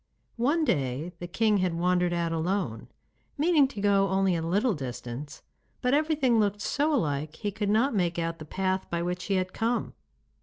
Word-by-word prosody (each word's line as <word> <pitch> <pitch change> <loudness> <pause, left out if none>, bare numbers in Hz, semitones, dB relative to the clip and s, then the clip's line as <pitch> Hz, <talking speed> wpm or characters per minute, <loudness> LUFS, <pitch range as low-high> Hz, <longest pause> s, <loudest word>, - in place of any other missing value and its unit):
One 305 +6 +2
day 140 - -1
the 175 - -5
king 215 +3 +2
had 185 -3 0
wandered 180 0 +2
out 170 -1 -1
alone, 165 - -2 0.5
meaning 300 -2 +4
to 240 -6 -8
go 200 -1 +3
only 190 -1 +2
a 165 - -1
little 205 +8 +1
distance, 130 -1 -6 0.4
but 250 0 +1
everything 290 -6 +2
looked 205 -1 +1
so 295 +8 0
alike 155 - -1
he 205 - -3
could 205 0 -2
not 230 +6 +3
make 175 -4 0
out 165 0 -2
the 155 - -8
path 190 +3 -2
by 170 0 -1
which 180 +1 -3
he 195 - 0
had 185 0 -1
come. 235 +2 -1
190 Hz, 185 wpm, -28 LUFS, 170-225 Hz, 0.5 s, meaning